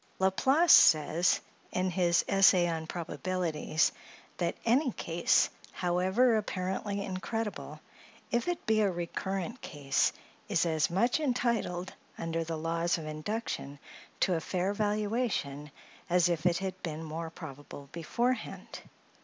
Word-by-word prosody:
La 190 0 +3
Place 290 - +3
says, 160 +3 +5 0.3
in 185 0 0
his 175 -1 +2
"Essay 195 -3 +5
on 160 -1 -3
Probabilities," 170 -2 -1 0.5
that - - -1
"any 255 +4 +3
case, 170 +1 +2 0.3
however 190 +7 +2
apparently 200 0 -3
incredible, 185 -7 -4 0.5
if 240 +4 0
it 350 -1 -2
be 220 -1 +3
a 205 - +3
recurrent 190 +5 -4
case, 140 -3 0 0.4
is - - +2
as 160 -2 +1
much 230 - +2
entitled, 235 - -1 0.2
under 165 0 -2
the 165 0 -4
laws 165 +2 0
of 160 - -7
induction, 155 -2 -4 0.4
to 185 - +3
a 165 - 0
fair 185 +4 -1
valuation, 205 - -1 0.4
as 175 0 +4
if 170 0 +1
it 170 -1 +2
had 190 -1 -4
been 160 -1 -5
more 160 +1 -5
probable 145 -3 -10
beforehand." 240 +10 -3
180 Hz, 130 wpm, -30 LUFS, 165-210 Hz, 0.5 s, says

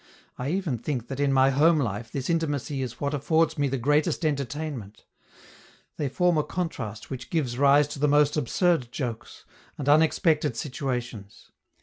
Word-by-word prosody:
I 125 +3 -4
even 170 -8 -1
think 120 -2 -4
that 135 0 -5
in 140 -1 +2
my 135 0 +4
home 155 +5 +4
life 110 -4 -3
this 135 -2 -4
intimacy 145 -4 -1
is 125 -2 -5
what 140 +1 -2
affords 160 +3 +1
me 145 - +2
the 135 0 -1
greatest 145 +6 +1
entertainment. 140 -6 -4 0.9
They 145 -3 -1
form 175 +3 +2
a - - +1
contrast 140 - -5
which 130 -1 -6
gives 130 -7 -1
rise 140 +1 +5
to 145 - -7
the 150 - +3
most 145 0 +3
absurd 150 -2 +1
jokes, 120 -5 -6 0.3
and 140 - -5
unexpected 155 - +3
situations. 125 -7 -5
140 Hz, 160 wpm, -26 LUFS, 125-155 Hz, 0.9 s, rise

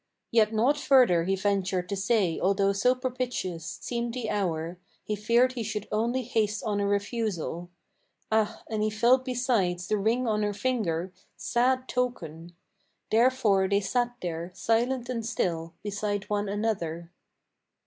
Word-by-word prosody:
Yet 220 -2 +4
naught 240 +7 +2
further 250 - +4
he 195 +1 +1
ventured 190 -2 0
to 200 - -1
say 195 -4 +1
although 195 +1 +2
so 250 +6 +3
propitious 250 - -3
Seemed 235 0 -3
the 240 -4 -3
hour: 175 -3 -2 0.2
he 215 - -2
feared 235 +5 +3
he 245 - -4
should 210 -1 -4
only 235 +4 0
haste 215 -3 0
on 210 -2 -1
a 200 - +1
refusal. 200 -4 -2 0.6
Ah, 220 -1 +1
and 220 -1 -2
he 215 - +2
felt 240 +4 +3
besides 235 -9 0
the 215 - +1
ring 235 +5 +1
on 215 -1 +1
her 205 -1 -1
finger, 195 -7 -1 0.2
sad 255 +2 +1
token! 175 -10 -3 0.6
Therefore 220 -5 +3
they 200 0 +3
sat 245 +4 0
there, 170 0 -3
silent 240 +2 0
and 240 -2 -3
still, 170 -7 -2
beside 205 0 -2
one 205 -1 0
another. 175 -6 -2
210 Hz, 150 wpm, -27 LUFS, 190-240 Hz, 0.6 s, Yet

